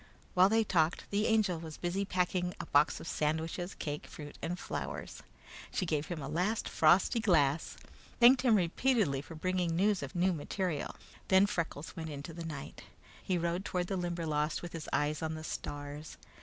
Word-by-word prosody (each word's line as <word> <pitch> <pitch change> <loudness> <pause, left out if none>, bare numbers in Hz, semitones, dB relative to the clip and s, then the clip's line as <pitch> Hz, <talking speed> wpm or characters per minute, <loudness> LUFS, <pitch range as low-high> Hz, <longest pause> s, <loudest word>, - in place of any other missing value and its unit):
While 185 +1 +6
they 225 +1 +4
talked, 170 -5 +1
the 205 +1 +2
Angel 215 -7 +2
was 160 -2 -8
busy 185 +3 -1
packing 180 -1 0
a - - -4
box 145 +2 +3
of - - -9
sandwiches, 160 +4 -1
cake, 145 -1 -4
fruit, 145 -1 -9
and 175 +2 -2
flowers. - - -5 0.5
She 185 - -1
gave 155 -2 -1
him 165 -5 -4
a - - -4
last 190 +9 0
frosty 180 +9 +4
glass, 160 -8 +2 0.4
thanked 250 +2 +8
him 245 -4 +5
repeatedly 190 - +2
for 160 - -10
bringing 180 0 0
news 200 +2 +2
of - - -6
new 180 +1 +3
material; 165 0 -3 0.3
then 190 +1 +6
Freckles 165 -5 -3
went 160 -1 -5
into 145 +2 -7
the 170 +1 -6
night. 145 -4 -7 0.4
He 185 - 0
rode 170 +2 -1
toward 180 -3 -1
the 195 - -2
Limberlost 165 -4 -1
with 175 - -7
his 165 -2 -6
eyes 150 +1 0
on 160 0 -2
the 155 - -7
stars. 145 0 -6
170 Hz, 180 wpm, -32 LUFS, 155-190 Hz, 0.5 s, thanked